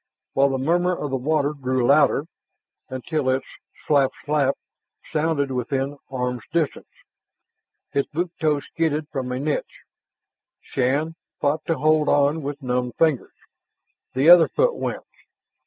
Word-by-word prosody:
While 140 +1 +4
the 135 - -1
murmur 175 +6 +1
of 145 - -4
the - - 0
water 145 +2 0
grew 130 -3 -1
louder, - - +4 0.6
until 130 +2 -2
its 130 +1 0 0.4
slap 140 -3 +3 0.2
slap 145 -2 +2 0.6
sounded 155 -3 0
within 135 +3 -2
arms' 125 -2 -2
distance. 160 -3 -1 1.0
His 140 - 0
boot 170 +3 -3
toe 150 -2 +2
skidded 155 -1 -2
from 130 -4 -4
a 125 - -2
niche. 150 +2 -3 0.8
Shann 140 +5 -1 0.3
fought 150 +2 0
to 165 - +1
hold 155 0 +3
on 145 +2 +3
with 145 0 -6
numbed 125 -1 -1
fingers. 155 -6 +1 0.8
The 135 +4 +2
other 175 -1 +9
foot - - +1
went. - - -4
145 Hz, 135 wpm, -23 LUFS, 130-155 Hz, 1.0 s, other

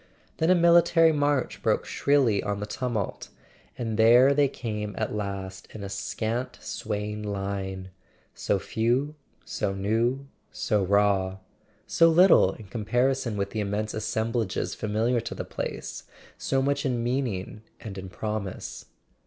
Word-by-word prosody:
Then 160 - +1
a 185 - +6
military 170 -1 +5
march 145 -3 0
broke - - +1
shrilly 135 -8 +2
on 105 -1 -2
the 105 - -3
tumult; 115 -3 -3 0.5
and 115 -3 -3
there 120 +5 +7
they 145 0 +4
came 105 -6 -5
at 110 - -2
last, 95 -2 -5
in 105 - -6
a 100 - -5
scant 115 +5 -3
swaying 105 0 -4
line— 95 -2 -4 0.4
so 100 - 0
few, 120 +9 0 0.3
so 95 - -2
new, 115 +7 0 0.2
so 105 -4 0
raw; 95 -1 +2 0.5
so 165 0 +4
little, 165 - +6
in 110 - -12
comparison 120 +3 0
with 100 0 -2
the 110 - -3
immense 105 +1 -2
assemblages 110 -1 -1
familiar 110 +3 0
to 115 - -5
the - - -5
place, - - -5 0.3
so 135 0 0
much 140 +1 0
in 125 -4 -1
meaning 120 -5 -2 0.2
and 105 -3 -8
in 95 0 -8
promise. 100 +1 -5
110 Hz, 140 wpm, -26 LUFS, 100-130 Hz, 0.5 s, there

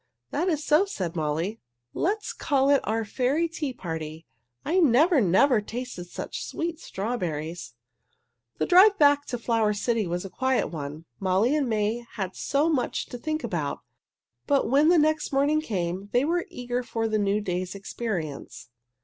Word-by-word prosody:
"That 340 +6 0
is 305 -3 -1
so," 310 +6 +4
said 185 - -4
Molly. 160 +7 -2 0.3
"Let's 420 +4 -1
call 275 -1 +2
it 280 - +4
our 225 +1 -1
Fairy 270 +9 0
Tea 320 -4 -4
Party. 160 -6 -6 0.4
I 360 +4 +2
never, 310 +1 +5
never 215 +6 +4
tasted 230 -4 -6
such 175 - -6
sweet 330 -1 -4
strawberries!" 175 - -4 0.8
The - - 0
drive 390 +3 +6
back 285 -1 +4
to 245 - -3
the 230 - -19
Flower 225 -3 +2
City 220 -1 0
was 175 +2 -3
a - - -6
quiet 260 +4 0
one. 150 0 -6
Molly 195 +8 +2
and 285 -5 0
May 220 +2 0
had 190 -3 -4
so 285 +3 +1
much 295 -7 0
to 245 - -7
think 310 +4 -3
about. - - -3 0.7
But 280 -2 +2
when 285 +4 +4
the 350 - +5
next 310 0 +2
morning 285 +3 +2
came 190 - -3
they 245 +3 +3
were 345 +2 0
eager 245 0 -3
for 225 -2 -2
the 215 -1 0
new 200 0 +1
day's 185 -1 -3
experience. 170 - -5
240 Hz, 165 wpm, -26 LUFS, 185-295 Hz, 0.8 s, drive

